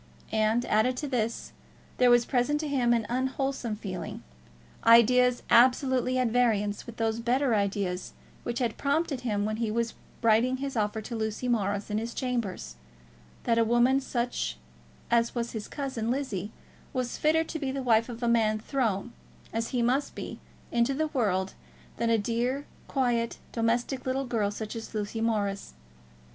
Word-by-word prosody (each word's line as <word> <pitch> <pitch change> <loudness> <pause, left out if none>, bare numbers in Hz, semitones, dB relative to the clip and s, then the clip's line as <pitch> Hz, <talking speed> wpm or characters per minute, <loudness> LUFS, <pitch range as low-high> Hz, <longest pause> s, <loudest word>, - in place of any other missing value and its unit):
And, 220 +2 +2
added 240 +4 +2
to 295 - -3
this, 230 -4 -2 0.5
there 250 -1 +6
was 240 -1 +5
present 275 +3 +1
to 310 - -3
him 255 -4 +2
an 230 -2 +2
unwholesome 260 -2 -1
feeling, 185 -5 -6 0.6
ideas 245 +2 +6
absolutely 255 +1 +4
at 250 -2 +2
variance 220 -4 +1
with 235 - -9
those 225 0 0
better 245 +2 +1
ideas 200 -3 -1 0.3
which 235 0 -3
had 240 -3 -1
prompted 280 -2 0
him 210 -4 -1
when 215 0 -2
he 230 -1 -1
was 230 +1 -1 0.3
writing 230 +3 +4
his 275 0 -4
offer 215 0 0
to 230 +2 -6
Lucy 220 +2 -2
Morris 205 -3 0
in 210 - +1
his 230 +1 -5
chambers, 230 - -3 0.7
that 230 -1 +2
a - - +5
woman 240 +4 +4
such 245 -2 -2 0.5
as 235 +1 +2
was 235 -1 -2
his 220 -2 -5
cousin 260 -6 -3
Lizzie 220 -7 -2 0.4
was 255 -2 -2
fitter 320 +1 +3
to 320 0 -5
be 275 -3 -2
the 270 0 -3
wife 230 -1 +3
of 240 0 -7
a - - +2
man 220 -2 +3
thrown, 230 -2 -1 0.4
as 225 +1 -1
he 245 -2 0
must 260 +4 +1
be, - - -6 0.3
into 235 +3 +2
the 310 +2 0
world, 195 -9 0 0.4
than 235 - 0
a 230 - +4
dear, 240 +6 -1 0.2
quiet, 240 -4 0
domestic 240 +3 0
little 265 +1 0
girl 225 -5 0
such 215 +2 -6
as 225 0 -7
Lucy 215 +1 -3
Morris. 205 - -1
235 Hz, 165 wpm, -28 LUFS, 220-255 Hz, 0.7 s, there